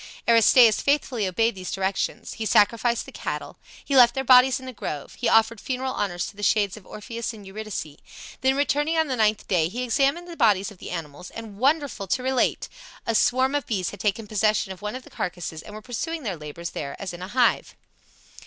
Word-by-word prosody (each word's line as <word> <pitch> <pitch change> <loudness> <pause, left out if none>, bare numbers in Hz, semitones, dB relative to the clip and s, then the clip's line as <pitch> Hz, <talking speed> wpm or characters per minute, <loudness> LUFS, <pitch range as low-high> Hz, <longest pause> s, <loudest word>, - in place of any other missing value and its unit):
Aristaeus 230 0 +6
faithfully 265 -7 +1
obeyed 225 +5 +1
these 185 -2 -7
directions. 195 +3 -2
He 225 -1 -3
sacrificed 230 +2 +3
the - - -11
cattle, - - -5 0.3
he 280 - -1
left 240 -2 +7
their 265 - -1
bodies 255 0 +6
in 260 - -11
the 255 - -7
grove, 150 - -6
he 245 - -1
offered 225 -1 +3
funeral 260 0 -3
honors 175 -3 -2
to - - -9
the 205 - -10
shades 205 -1 +2
of 210 -4 -14
Orpheus 230 +2 -6
and 210 -2 -12
Eurydice; 195 -7 -6 0.4
then 265 +1 +3
returning 295 +3 +1
on 320 -2 +2
the 260 - 0
ninth 215 -2 +1
day 170 -4 +2
he 245 +6 -4
examined 275 +8 +1
the 340 - -8
bodies 210 - +2
of 195 - -15
the - - -8
animals, 165 -1 -7
and, 220 -3 -9
wonderful 275 -6 +1
to 250 +7 -1
relate! 260 0 0 0.4
a 230 - 0
swarm 260 +4 +2
of 290 -3 -1
bees 190 -6 -1
had 205 - -11
taken 210 +2 -1
possession 215 -1 +1
of 180 - -16
one 210 +3 -4
of 255 - -7
the - - -16
carcasses 175 -3 -5
and 210 - -11
were 215 - -9
pursuing 315 +7 -4
their 200 -6 -2
labors 155 +2 -7
there 140 -2 -6
as 195 -3 -5
in 175 - -9
a 185 - -5
hive. 245 +3 +1
220 Hz, 215 wpm, -24 LUFS, 195-255 Hz, 0.4 s, left